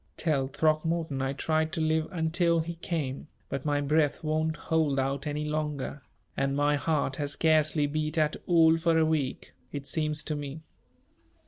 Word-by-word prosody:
"Tell 140 -5 +1
Throckmorton 155 0 0
I 135 +1 -1
tried 160 +2 0
to - - -1
live 160 0 +1
until 170 0 +1
he 170 +2 -4
came, 160 -5 -4 0.2
but 135 0 -4
my 145 -1 +1
breath 150 +1 +1
won't 155 +1 0
hold 155 -4 0
out 135 +1 -1
any 150 +1 -2
longer, 150 -2 -3 0.3
and 135 0 0
my 145 +1 +3
heart 145 -2 0
has 145 -1 -1
scarcely 155 -1 +3
beat 155 +2 -2
at 155 -1 +2
all 165 -2 +5
for 165 0 +2
a 160 - +4
week, 155 -4 -2 0.2
it 140 -1 -5
seems 150 -2 -1
to 155 - -3
me." 145 +2 -6
155 Hz, 165 wpm, -28 LUFS, 145-160 Hz, 0.3 s, all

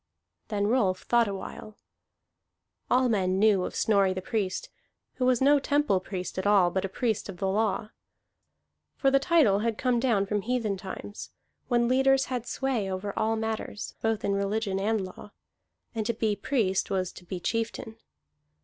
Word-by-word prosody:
Then 205 -2 -1
Rolf 205 -5 +1
thought 235 -1 +3
awhile. 200 +2 -7 1.1
All 255 +1 +4
men 190 -5 +1
knew 205 -2 +4
of - - -6
Snorri 200 -3 +3
the - - -2
Priest, 200 -4 -2 0.5
who 255 - +1
was 255 -1 +3
no 285 +2 +5
temple 285 -8 +2
priest 185 0 -5
at 190 - -1
all 195 -4 +5
but 190 - -1
a 195 - -2
priest 220 0 -1
of 190 - -7
the 195 - -1
law. 210 +1 0 1.0
For 270 - +2
the 275 - +5
title 275 - +4
had 225 0 -1
come 250 -2 +1
down 230 -6 +2
from 205 +1 -1
heathen 230 -2 -1
times, 195 +2 -8 0.4
when 240 -1 +2
leaders 270 +1 +3
had 245 -1 -3
sway 245 -8 -1
over 195 +2 -3
all 220 +1 +1
matters, 220 -1 -4
both 225 -1 0
in 200 - +1
religion 200 0 -1
and 210 0 0
law, 185 +2 -11 0.6
and 225 -2 -2
to 235 - 0
be 215 -2 0
priest 200 -3 0
was 185 -2 -1
to - - -13
be 180 +1 -5
chieftain. 225 +3 -3
215 Hz, 170 wpm, -28 LUFS, 195-240 Hz, 1.1 s, no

